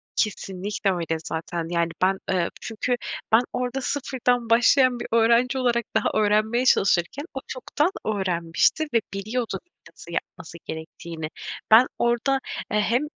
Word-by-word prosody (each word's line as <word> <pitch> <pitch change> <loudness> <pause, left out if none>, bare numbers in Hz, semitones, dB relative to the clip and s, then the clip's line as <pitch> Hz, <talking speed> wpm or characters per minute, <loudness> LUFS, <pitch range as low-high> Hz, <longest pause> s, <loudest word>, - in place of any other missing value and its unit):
Kesinlikle 195 -1 -1
öyle 165 -3 -1
zaten, 165 +1 -4
yani, 170 -1 +1
ben, 190 +1 +3
ııı, 180 -2 +1
çünkü 225 +3 -1 0.4
ben 225 +2 +7
orada 250 +2 -2
0'dan 250 -4 -1
başlayan 245 +2 +5
bir 240 - -5
öğrenci 235 +3 +3
olarak 240 -2 +1
daha - - +2
öğrenmeye 215 +4 +2
çalışırken 195 - +2
o 265 - -3
çoktan 290 +5 -1 0.2
öğrenmişti 185 - +1
ve 230 - +4
biliyordu 220 +4 -3 0.3
nasıl - - -13
yapması 170 - -6
gerektiğini. 160 0 -7 0.4
Ben 235 +4 +8
orada, 240 +3 +2 0.3
eee, 210 - +2
hem 235 +5 +2
225 Hz, 130 wpm, -24 LUFS, 185-245 Hz, 0.4 s, Ben